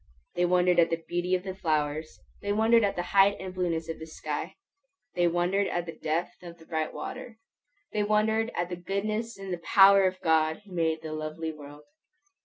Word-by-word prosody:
They 175 - +1
wondered 180 0 +3
at 165 -1 +5
the 165 0 -2
beauty 175 +1 0
of 180 - -3
the 190 -1 -5
flowers; 155 -3 -2 0.2
they 205 - -2
wondered 225 +2 +4
at 200 - +1
the 175 - -2
height 200 0 +5
and 190 -1 -6
blueness 170 -3 -2
of 165 - -5
the 160 - -8
sky; 155 -2 -5 0.6
they 175 -1 +2
wondered 175 +4 +1
at 175 0 -2
the 165 - -5
depth 160 +2 -3
of 170 -1 -10
the 160 - -17
bright 160 -1 -2
water; 240 +8 -7 0.6
they 210 - +1
wondered 215 +2 +2
at 175 0 -1
the 180 - -4
goodness 215 +5 -3
and 195 -1 -5
the 175 - -4
power 195 +2 +6
of 185 0 -4
God 160 +2 +2
who 200 - -17
made 160 -2 -1
the 155 -1 -5
lovely 155 +1 -4
world. 145 -1 -12
175 Hz, 205 wpm, -28 LUFS, 160-195 Hz, 0.6 s, power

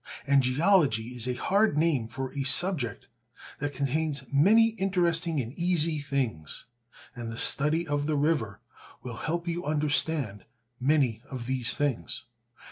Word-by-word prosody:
And 140 -1 +4
geology 130 - +2
is 125 -1 -3
a 125 - -1
hard 200 - +2
name 150 -8 +1
for 130 +3 -5
a 140 - -3
subject 140 -1 +1 0.5
that 145 0 -2
contains 140 +1 -1
many 215 +11 +5
interesting 175 -6 0
and 120 -1 -4
easy 165 -3 +1
things, 130 - -3 0.5
and 120 -3 -6
the 115 - -7
study 155 +7 +1
of 145 0 -1
the 155 -1 0
river 140 -9 0 0.4
will 120 -2 -6
help 170 +2 -3
you 170 +1 -2
understand 145 -7 0 0.3
many 130 -4 +2
of 130 -3 -6
these 125 -2 +1
things. 145 -6 -2
145 Hz, 140 wpm, -28 LUFS, 125-165 Hz, 0.5 s, many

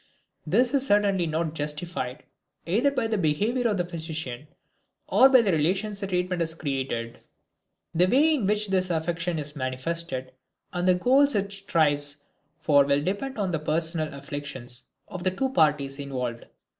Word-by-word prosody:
This 240 - +2
is 275 -2 +2
certainly 200 -5 +2
not 160 0 -1
justified 150 -3 -4 0.4
either 225 +11 +2
by 260 -4 -1
the 220 -2 0
behavior 210 +10 +1
of 210 -3 0
the 175 - 0
physician 160 -6 -5 0.6
or 265 - +6
by 260 -3 +6
the 200 - +2
relations 190 +6 0
the 195 - -3
treatment 180 -1 -1
has 160 -1 -2
created. 130 -6 -3 0.7
The 175 +2 +4
way 295 +9 +4
in 245 -10 0
which 210 0 +1
this 185 -1 +1
affection 170 +1 -1
is 150 0 -6
manifested 130 0 -2 0.4
and 175 0 -1
the 185 - +5
goals 265 +8 +4
it 200 0 -1
strives 145 -7 +1 0.4
for 145 -2 +4
will 140 +1 +1
depend 205 - -3
on 195 -3 -1
the 160 - -1
personal 160 +1 -1
affiliations 140 -3 -6 0.2
of 185 - -7
the 185 - +4
two 265 +9 -1
parties 145 - +1
involved. 125 -4 -4
170 Hz, 160 wpm, -26 LUFS, 145-200 Hz, 0.7 s, or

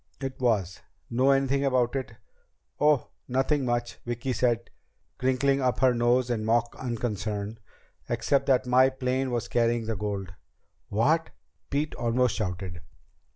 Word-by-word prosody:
"It 135 -1 -5
was! 105 -8 +1 0.3
Know 130 +3 +3
anything 135 0 +2
about 130 -2 +2
it?" 130 -4 -4 0.6
"Oh, 150 -2 +3 0.2
nothing 135 +2 +1
much," 120 -1 -2
Vicki 120 +2 -3
said, 120 -2 0 0.5
crinkling 135 +2 +2
up 125 -1 +1
her 130 -1 +5
mouth 120 +1 +2
in 110 -3 -1
mock 115 +2 +1
unconcern, 110 -3 -3 0.5
"except 140 - +1
that 130 -2 +3
my 130 +1 +5
plane 130 0 -1
was 120 -2 -2
carrying 115 -1 +1
the 115 0 -2
gold." 100 -2 -4 0.6
"What?" 155 +10 +2 0.4
Pete 145 +2 -1
almost 120 +1 +1
shouted. 90 -5 -4
125 Hz, 135 wpm, -27 LUFS, 115-130 Hz, 0.6 s, her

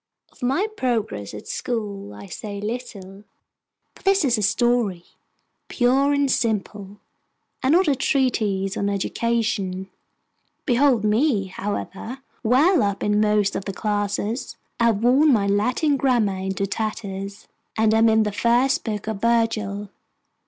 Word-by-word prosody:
Of - - -24
my 270 +11 +1
progress 220 - -2
at 105 - -10
school 205 - -4
I 105 0 -10
say 200 - -7
little; 205 -3 -6 0.7
for - - -19
this 390 -4 +3
is 245 -3 +3
a 215 - -2
story, 215 -3 +1 0.6
pure 265 +3 +2
and 285 -1 +2
simple, 210 -3 -2 0.6
and 265 +3 +2
not 360 +1 +4
a 285 - +3
treatise 215 -8 0
on 200 - -1
education. 200 -2 -1 0.7
Behold 250 -3 +3
me, 215 +1 +2
however, 205 +5 -5 0.2
well 280 - +4
up 200 -1 -1
in 210 0 +2
most 210 -2 +2
of 195 - -3
the 195 - -4
classes. 205 +3 -2 0.2
I 235 - +3
have 225 -2 +2
worn 275 +5 +5
my 210 -6 +3
Latin 250 +9 +1
grammar 240 -7 +1
into 190 +1 -2
tatters, 200 -2 -5 0.3
and 220 0 +3
am 225 +1 +5
in 220 0 +4
the 210 - -1
first 235 +7 +2
book 215 -2 -4
of 215 -3 -4
Virgil. 220 -3 0
220 Hz, 140 wpm, -23 LUFS, 200-245 Hz, 0.7 s, worn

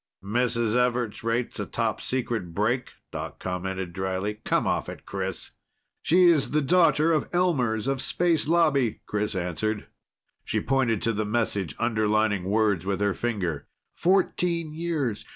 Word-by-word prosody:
"Mrs. 115 +1 +1
Everts 125 -3 0
rates 115 +1 -1
a - - -3
topsecret 115 -9 -2
break?" 115 +5 0 0.2
Doc 75 -2 -6
commented 95 -1 -4
dryly. 95 +3 -3
"Come - - +1
off - - 0
it, - - -9
Chris!" - - -4 0.5
"She's 170 -4 +4
the 150 - +1
daughter 165 +1 +4
of 155 -3 +1
Elmers 130 - +1
of 135 -1 0
Space 170 -4 +1
Lobby!" 150 -9 +2
Chris 105 -1 -2
answered. 95 +4 -2 0.6
She - - -1
pointed 125 -6 +1
to 115 - +1
the 110 +1 -1
message, 105 -7 -1
underlining 110 -4 +1
words 100 -3 +2
with 95 0 -1
her 100 -1 +1
finger. 95 -11 -2 0.3
"_Fourteen 170 -3 +1
years. 155 -10 -2
115 Hz, 135 wpm, -26 LUFS, 100-140 Hz, 0.6 s, She's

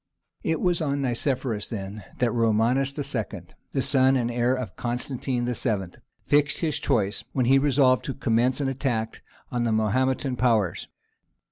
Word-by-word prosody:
It 160 -1 0
was 175 -2 +1
on 140 -2 0
Nicephorus 125 -3 -1
then 100 -2 -6
that 120 -2 +1
Romanus 115 +4 +2
II., 120 - -3 0.3
the 135 - 0
son 135 -1 +3
and 120 -2 0
heir 120 +2 +1
of 120 -8 -5
Constantine 125 +1 -2
VII., 110 -7 -2 0.3
fixed 145 0 +2
his 155 -3 0
choice, 100 -2 0
when 130 -3 +1
he 135 +2 +5
resolved 135 -2 +3
to 135 - -3
commence 125 +1 +1
an 140 - 0
attack 125 -4 -2 0.3
on 120 -2 0
the 115 - +1
Mahometan 130 +4 +1
powers. 115 -7 +1
125 Hz, 150 wpm, -25 LUFS, 115-135 Hz, 0.3 s, he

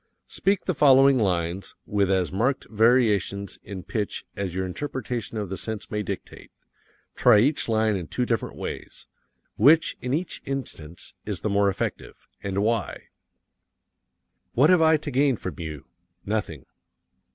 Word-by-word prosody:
Speak 195 0 0
the 185 - +1
following 135 -2 +6
lines 90 -2 -1
with 100 -2 +1
as 95 -2 +1
marked 120 +8 0
variations 105 -4 +2
in 95 -2 -8
pitch 105 0 -3
as 95 -3 -4
your 95 0 -1
interpretation 120 +1 -4
of 105 -3 -3
the 95 - -4
sense 110 -2 -6
may 105 - -1
dictate. 100 - -7 0.6
Try - - +5
each 140 0 +1
line 110 -1 +2
in 90 -4 -4
two 125 - -1
different 115 -4 -2
ways. - - -7 0.5
Which, 155 +8 +5
in 125 - -3
each 165 +6 -2
instance, 85 - -6
is - - -3
the 105 - -1
more 100 0 +3
effective 85 -9 -5
and 100 0 -1
why? 115 -1 -2 1.4
What 145 +8 +5
have 180 -2 +5
I 160 0 +5
to 150 0 -6
gain 135 0 +3
from 95 0 -6
you? 80 -4 -6 0.4
Nothing. 100 - -3
110 Hz, 150 wpm, -25 LUFS, 95-135 Hz, 1.4 s, following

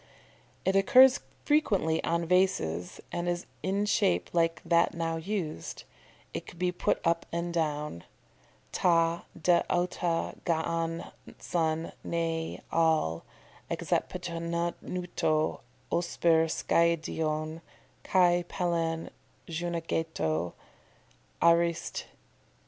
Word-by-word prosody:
"] - - -32
It 190 - +2
occurs 255 +7 +7 0.3
frequently 200 - +2
on 170 0 0
vases, 125 - +1
and 175 0 -2
is 175 0 -2 0.2
in 200 +2 0
shape 90 - +1
like 165 -1 +2
that 170 -1 +3
now 165 -1 -1
used. 165 - -4 0.5
It - - -5
could - - -11
be 180 +1 +1
put 180 - 0
up 170 0 +1
and 170 +1 -2
down. 150 - -2 0.7
"ta 170 -1 +2
d' 170 +1 +4
ota 175 -1 0
g'an 165 0 -1 0.3
son, 160 -1 -1
nae 165 -1 -2
AL', 160 - +2 0.5
exepetannuto 170 -2 -1 0.3
osper 170 -1 +2
skiadeion, 160 -1 0 0.4
kai 175 -2 +3
palin 165 -3 -1 0.4
xunaegeto." 160 - -2 0.9
_Arist. 170 0 +2
170 Hz, 95 wpm, -29 LUFS, 160-175 Hz, 0.9 s, occurs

